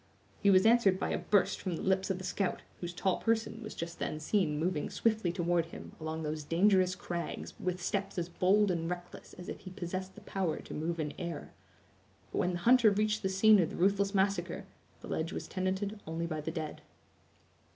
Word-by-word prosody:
He 200 - +5
was 190 0 +6
answered 220 -5 +5
by - - -1
a - - 0
burst 205 -3 +2
from 180 -3 -2
the - - -5
lips 190 0 +1
of 190 - 0
the 185 - -7
scout, 195 0 -1 0.2
whose 175 -1 -4
tall 185 +1 0
person 225 0 0
was 215 - -7
just 170 +1 -5
then 155 - -2
seen 155 -2 +1
moving 160 -1 -1
swiftly 220 -6 +1
toward 175 -2 +1
him, - - -9
along 160 0 -4
those 155 0 -3
dangerous 185 +3 +3
crags, 175 -1 -5
with 180 0 -2
steps 195 +2 -2
as 170 -1 -1
bold 190 +3 +3
and 165 -1 -1
reckless 175 0 -7
as 180 - -10
if - - -5
he 185 - -9
possessed 185 +1 -5
the - - -12
power 185 -5 -1
to - - -9
move 165 +2 -2
in 150 -2 -2
air. 170 -4 -5 0.8
But - - -1
when 180 - +1
the - - -1
hunter 235 +4 +6
reached 210 +1 +1
the 190 - 0
scene 210 +2 +6
of 170 - +2
the - - -7
ruthless 200 +2 +2
massacre, 190 -3 0 0.4
the - - -9
ledge 160 +2 -2
was - - -5
tenanted 190 +2 -2
only 165 +1 -2
by 155 -2 -3
the 150 - -3
dead. 160 -2 -5
185 Hz, 210 wpm, -32 LUFS, 170-200 Hz, 0.8 s, was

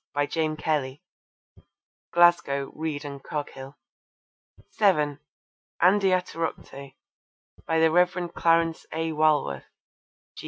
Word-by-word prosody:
By 145 0 +2
James 155 0 -2
Kelly. 145 -3 -2 1.1
(Glasgow: 170 -6 +3
Reid 155 -2 -4
and 140 -1 -7
Coghill.) 140 -2 -7 0.9
(7) 150 -9 +1 0.6
Andiatorocte. 180 -7 0 0.7
By 160 0 +1
the 160 0 +4
Rev. 180 0 +1
Clarence 165 -1 +1
A. 160 0 -2
Walworth. 150 - +1
155 Hz, 85 wpm, -25 LUFS, 145-170 Hz, 1.1 s, the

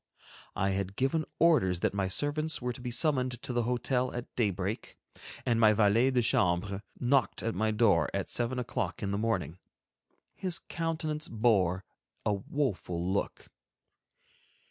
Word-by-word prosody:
I 95 +1 +1
had 95 0 -2
given 135 +6 +1
orders 95 - +3
that - - +1
my 100 -1 0
servants 150 +8 0
were 125 -1 -2
to 120 - -11
be 125 - -4
summoned 130 -2 +1
to 125 - -4
the 120 - +2
hotel 125 +1 0
at 120 - -7
daybreak, 100 -2 -2 0.5
and 115 -2 +2
my 110 -2 +6
valet 110 +4 +4
de 125 -2 +2
chambre 100 -4 +1 0.2
knocked 130 +2 +1
at 115 - -1
my 110 +4 0
door 105 -8 +3
at 100 -1 -2
seven 120 +1 -1
o'clock 120 -6 -3
in 100 - -1
the 100 - -1
morning. 95 -7 -1 0.7
His 185 -3 -1
countenance 160 -2 -3
bore 95 -6 +2 0.4
a 105 - +2
woeful 100 -5 -2
look. 100 - -3
115 Hz, 150 wpm, -30 LUFS, 100-130 Hz, 0.7 s, my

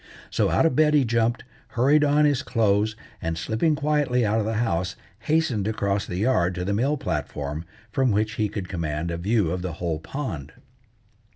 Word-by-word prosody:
So - - +2
out - - +3
of 160 - +2
bed 150 +1 +4
he 140 -3 +4
jumped, 115 0 +1 0.3
hurried 145 +5 +4
on 150 +1 +4
his 145 -3 +2
clothes, 105 -1 +1 0.3
and 80 0 -2
slipping 115 - +1
quietly 145 -5 +1
out 105 +2 +2
of 105 - -1
the 110 - -1
house, 90 -5 0 0.2
hastened 150 -10 +1
across 100 -2 -1
the 90 - -4
yard 95 -5 +2
to 90 +1 -3
the 100 - 0
mill 135 +8 +1
platform, 75 - -3 0.3
from 130 +2 +2
which 105 0 +1
he 105 -1 -1
could 100 -3 -5
command 85 -2 -3
a 85 - -3
view 100 -1 +1
of 90 0 -2
the 90 -2 -4
whole 80 -1 -3
pond. 80 - -5
110 Hz, 190 wpm, -25 LUFS, 90-130 Hz, 0.3 s, bed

